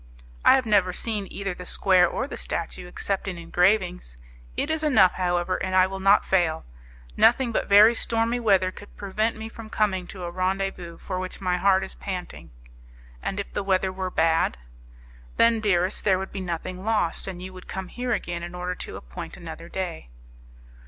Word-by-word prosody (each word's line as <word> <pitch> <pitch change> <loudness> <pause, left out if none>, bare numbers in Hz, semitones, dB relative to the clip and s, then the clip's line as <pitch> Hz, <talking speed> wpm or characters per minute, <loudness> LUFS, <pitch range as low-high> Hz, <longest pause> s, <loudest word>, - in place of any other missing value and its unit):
"I - - +8
have 260 -2 +1
never 200 -4 +3
seen 210 +1 -3
either 195 -1 -3
the 180 0 -9
square 185 -2 +5
or - - -2
the 280 - -7
statue 170 +1 -4
except 195 +2 -3
in 185 -2 -4
engravings; 180 - +1 0.4
it 295 - 0
is 315 0 -1
enough, 220 -12 +5
however, 175 0 0
and 185 0 -1
I 185 0 +6
will 190 +1 -5
not 195 +2 +4
fail. 170 -4 +1 0.5
Nothing 240 +1 +4
but - - -1
very 210 +3 +8
stormy 230 +1 0
weather 195 -5 +3
could 205 - -14
prevent 215 +3 -1
me 220 0 -6
from 225 -1 -10
coming 190 -4 0
to 185 -2 -9
a 175 - -4
rendezvous 185 -2 -2
for 185 -2 -5
which 185 0 -6
my 180 -2 0
heart 190 0 +3
is 190 - -7
panting." 185 -2 -7 0.7
"And 195 - -3
if 200 - -6
the - - -1
weather 190 -1 +1
were 185 0 -3
bad?" 160 - +2 0.8
"Then, 230 -1 +5
dearest, 190 -2 +1
there 190 -3 +3
would 190 +1 -5
be 195 - -5
nothing 180 +1 -5
lost; 210 -7 0
and 185 -2 -6
you 185 +1 -8
would 185 0 -12
come 190 -1 -5
here 250 0 -4
again 175 -6 -2
in 175 +1 -7
order 180 0 -3
to - - -8
appoint 60 0 -9
another - - -9
day." - - -5
190 Hz, 190 wpm, -25 LUFS, 180-210 Hz, 0.8 s, I